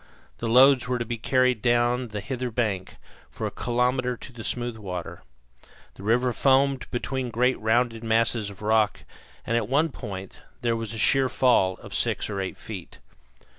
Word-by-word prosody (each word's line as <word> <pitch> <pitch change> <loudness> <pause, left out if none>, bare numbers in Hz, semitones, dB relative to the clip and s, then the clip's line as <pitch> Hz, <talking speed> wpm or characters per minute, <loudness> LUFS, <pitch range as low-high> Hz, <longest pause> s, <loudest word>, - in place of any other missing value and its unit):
The 115 - -2
loads 130 +2 +6
were 125 0 0
to 120 - -3
be 115 0 -4
carried 130 -1 +2
down 120 +1 +2
the 105 -2 -5
hither 125 +3 -3
bank, 110 -6 -2 0.3
for - - -5
a - - -2
kilometre, 125 +1 0
to 125 - -11
the 115 -2 -8
smooth 120 0 -2
water. 90 -5 -6 0.7
The - - -14
river 120 +4 +2
foamed 135 0 +2
between 130 +1 -3
great 125 +3 +1
rounded 115 +1 +1
masses 115 -1 +1
of 100 +1 -12
rock, 110 -1 +2 0.4
and 115 - 0
at 115 -2 0
one 150 +5 +2
point 95 -8 -8 0.2
there 115 -1 +1
was 115 0 -4
a - - -5
sheer 130 +4 +3
fall 115 -8 +3
of - - -10
six - - 0
or 100 -1 -2
eight 95 - -5
feet. 95 -6 -8
120 Hz, 175 wpm, -25 LUFS, 110-125 Hz, 0.7 s, loads